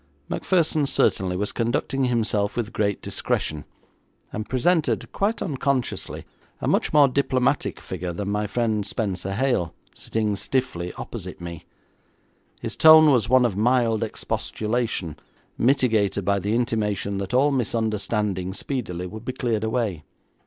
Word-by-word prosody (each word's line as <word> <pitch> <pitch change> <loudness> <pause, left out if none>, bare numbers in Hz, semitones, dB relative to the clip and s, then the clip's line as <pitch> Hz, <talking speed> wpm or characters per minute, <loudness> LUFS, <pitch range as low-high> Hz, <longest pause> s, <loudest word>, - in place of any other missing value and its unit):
Macpherson 160 -5 +1
certainly 95 -8 +1
was 105 +2 -1
conducting 120 +3 0
himself 110 -4 0
with 115 -1 -2
great 100 -3 -1
discretion, 75 -1 -2 0.7
and 110 0 -5
presented, 160 +5 +1
quite 205 +2 0
unconsciously, 140 -5 -2 0.3
a - - -3
much - - +2
more 145 -2 +6
diplomatic 135 0 0
figure 90 -1 -5
than 100 +4 -3
my 105 +1 0
friend, 110 -1 0
Spenser 95 -2 -3
Hale, 120 -9 0 0.2
sitting 110 -2 -2
stiffly 100 -7 -2
opposite - - -7
me. 85 -2 -8 1.0
His - - -4
tone 155 -1 +8
was 120 -5 +2
one 130 0 +5
of 110 -6 0
mild 115 0 +2
expostulation, 110 -6 -2 0.4
mitigated 115 -7 +2
by 100 0 +2
the 100 +4 -1
intimation 105 -4 -1
that 100 +4 -3
all 140 +3 +4
misunderstanding 105 -6 -1
speedily 95 -11 -4
would 110 +5 -8
be 125 - -4
cleared 115 -4 -1
away. 110 -8 -1
110 Hz, 130 wpm, -24 LUFS, 100-130 Hz, 1.0 s, tone